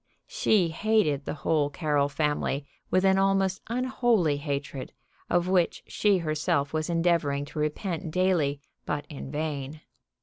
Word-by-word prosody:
She 220 - +2
hated 160 -6 +1
the - - -3
whole 150 -3 +2
Carroll 145 -1 0
family 145 -1 -1 0.2
with 185 +1 +2
an 190 0 +4
almost 195 -1 +2
unholy 235 - +1
hatred, 140 -2 -4 0.4
of 175 0 +2
which 185 -2 +1
she 205 -2 +2
herself 155 -3 0
was 155 +1 -1
endeavoring 165 -4 +1
to 150 - -7
repent 165 +3 -2
daily, 160 -5 +1 0.2
but 145 0 -3
in 140 -2 -7
vain. 150 0 -4
160 Hz, 135 wpm, -27 LUFS, 145-190 Hz, 0.4 s, an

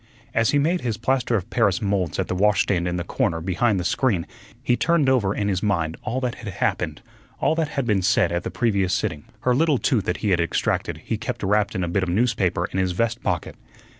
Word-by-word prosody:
As 115 0 +2
he 145 - +3
made 165 +5 +1
his 115 -3 -2
plaster 125 +1 0
of 95 -5 -3
paris 100 +3 +2
moulds 100 -6 -1
at - - -1
the - - -2
washstand 95 -2 +2
in 90 - -1
the 85 - -2
corner 85 -1 -1
behind 95 +5 +1
the - - -2
screen 95 -1 +1 0.4
he 120 - +2
turned 165 0 +2
over 125 -7 +3
in 100 - -1
his 95 -2 0
mind 85 -6 0
all 125 +1 -2
that 125 -2 -1
had 105 -5 -6
happened, - - -2 0.4
all - - +2
that 160 -1 0
had 135 - +1
been 105 -5 +2
said 95 0 +2
at 85 0 0
the - - -4
previous 100 -6 +1
sitting. 75 -2 -3 0.2
Her 125 - +2
little 150 +2 +3
tooth 115 - +1
that 90 - -1
he 100 - +2
had 90 - +3
extracted 85 - -1
he - - -2
kept - - -4
wrapped 105 +1 +1
in 95 - -1
a - - -1
bit 90 +3 0
of 95 - -1
newspaper 100 -2 +1
in 95 - -3
his 90 -1 0
vest 115 +4 -1
pocket. - - -2
100 Hz, 235 wpm, -23 LUFS, 90-120 Hz, 0.4 s, he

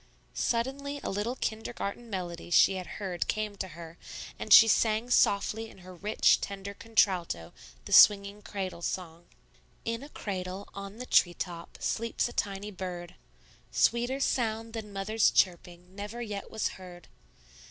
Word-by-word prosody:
Suddenly 275 +4 -1
a - - -2
little 210 +5 -2
kindergarten 225 -1 -4
melody 175 -4 -5
she 175 - +6
had 185 -1 -5
heard 185 -4 -3
came 215 -1 -2
to 190 - -3
her, 165 0 -11 0.4
and - - -6
she 225 - +11
sang 225 +2 +2
softly 220 +1 +2
in - - -16
her 185 - -10
rich, 205 +5 +3
tender 200 0 -5
contralto 185 - 0 0.3
the - - -4
swinging 200 0 +7
cradle 190 -4 -5
song: 170 -1 -5 0.6
"In 230 +1 -2
a 285 - -10
cradle, 190 -4 -5
on 200 +1 -8
the 250 - -6
treetop, 175 -4 +1
Sleeps 230 +1 -1
a 240 - -9
tiny 200 0 -3
bird; 180 -2 -6 0.6
Sweeter 240 +3 +2
sound 225 -4 -1
than 220 -2 -6
mother's 200 +3 +2
chirping 180 0 0
Never 205 +4 -6
yet 210 -4 -5
was 220 - -1
heard. 180 -2 -12
200 Hz, 145 wpm, -29 LUFS, 180-225 Hz, 0.6 s, she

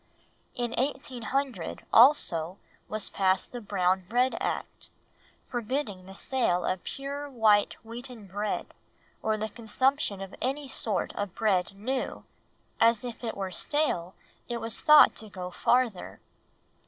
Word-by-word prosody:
In 240 -1 -2
1800, 260 - -2
also, 190 - +5 0.3
was 215 -1 0
passed 190 -1 +1
the 245 - -6
Brown 190 -2 +1
Bread 250 +3 +2
Act, - - -4 0.6
forbidding 235 -6 -3
the 190 - -10
sale 195 -8 0
of 185 -1 -1
pure 280 +1 -5
white 220 -5 +3
wheaten 235 -1 -9
bread, 205 +3 -3 0.5
or 220 0 0
the 215 +1 -2
consumption 235 0 0
of 195 0 -7
any 275 +3 -2
sort 215 -7 -1
of 205 -3 -4
bread 195 -4 +1
new, 255 +6 -3 0.6
as 230 0 +4
if 240 0 -7
it 225 - -3
were 190 -1 -3
stale 185 - -1 0.3
it 240 - -2
was 225 -1 -2
thought 300 0 +8
it - - -7
would 215 -2 -12
go 180 -1 -5
farther. 240 -2 +1
225 Hz, 135 wpm, -28 LUFS, 195-255 Hz, 0.6 s, thought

